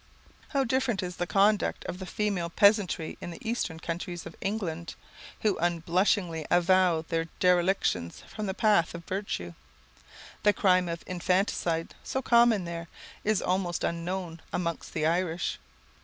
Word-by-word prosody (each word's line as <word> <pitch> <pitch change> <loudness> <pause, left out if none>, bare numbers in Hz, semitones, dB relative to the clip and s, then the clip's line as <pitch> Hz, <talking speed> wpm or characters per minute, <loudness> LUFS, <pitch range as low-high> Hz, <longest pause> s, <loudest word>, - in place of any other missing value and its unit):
How 275 -2 +1
different 240 -5 0
is 180 0 -5
the 175 - -1
conduct 205 +2 +2
of 180 - -5
the 185 - -6
female 195 -5 -1
peasantry 200 -4 +3
in - - -5
the 170 - -7
eastern 200 -8 -2
counties 175 +1 -5
of - - -9
England, 180 -5 -3 0.5
who 210 -3 +1
unblushingly 170 0 +1
avow 175 -2 +4
their 165 0 0
derelictions 175 - +2
from 215 -1 -6
the 190 - -2
paths 205 -7 +3
of 170 0 -8
virtue. 185 - -3 0.9
The 210 - +4
crime 185 -3 +3
of 170 0 -4
infanticide, 180 -2 0
so 265 - -2
common 235 -6 +4
there, 170 0 -5 0.4
is 215 -2 +1
almost 180 -2 0
unknown 170 0 -3
among 170 -2 -1
the 155 -2 -1
Irish. 170 +1 0
180 Hz, 140 wpm, -28 LUFS, 170-200 Hz, 0.9 s, avow